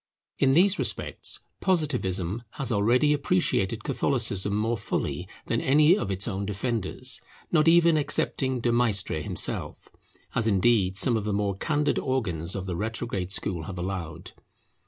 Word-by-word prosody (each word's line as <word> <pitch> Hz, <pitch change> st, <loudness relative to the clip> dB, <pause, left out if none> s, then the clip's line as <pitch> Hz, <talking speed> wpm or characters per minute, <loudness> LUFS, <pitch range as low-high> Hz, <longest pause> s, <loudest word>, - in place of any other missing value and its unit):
In 135 Hz, 0 st, +4 dB
these 195 Hz, +4 st, +4 dB
respects -, -, -2 dB, 0.2 s
Positivism 120 Hz, -, 0 dB
has 135 Hz, -4 st, -4 dB
already 120 Hz, +8 st, +3 dB
appreciated 140 Hz, -, 0 dB
Catholicism 105 Hz, -7 st, 0 dB
more 110 Hz, +3 st, 0 dB
fully 95 Hz, -3 st, -3 dB, 0.2 s
than 115 Hz, -, 0 dB
any 150 Hz, +5 st, +5 dB
of 100 Hz, -, -3 dB
its 95 Hz, +2 st, -2 dB
own 100 Hz, -3 st, -2 dB
defenders, 115 Hz, +4 st, -2 dB, 0.3 s
not 155 Hz, -2 st, +3 dB
even 170 Hz, -1 st, +6 dB
excepting 130 Hz, -3 st, 0 dB
De 120 Hz, -, +1 dB
Maistre 110 Hz, -9 st, 0 dB
himself, -, -, -3 dB, 0.4 s
as 115 Hz, -, 0 dB
indeed 95 Hz, -2 st, +3 dB
some 120 Hz, +4 st, +3 dB
of 110 Hz, -2 st, -1 dB
the 105 Hz, -, -1 dB
more 100 Hz, -1 st, 0 dB
candid 150 Hz, -, 0 dB
organs 95 Hz, -, -2 dB
of 95 Hz, -1 st, -4 dB
the 90 Hz, -2 st, -3 dB
retrograde 105 Hz, -2 st, -3 dB
school 90 Hz, -5 st, -2 dB
have 95 Hz, +1 st, -7 dB
allowed. 90 Hz, -3 st, -5 dB
110 Hz, 145 wpm, -26 LUFS, 95-135 Hz, 0.4 s, even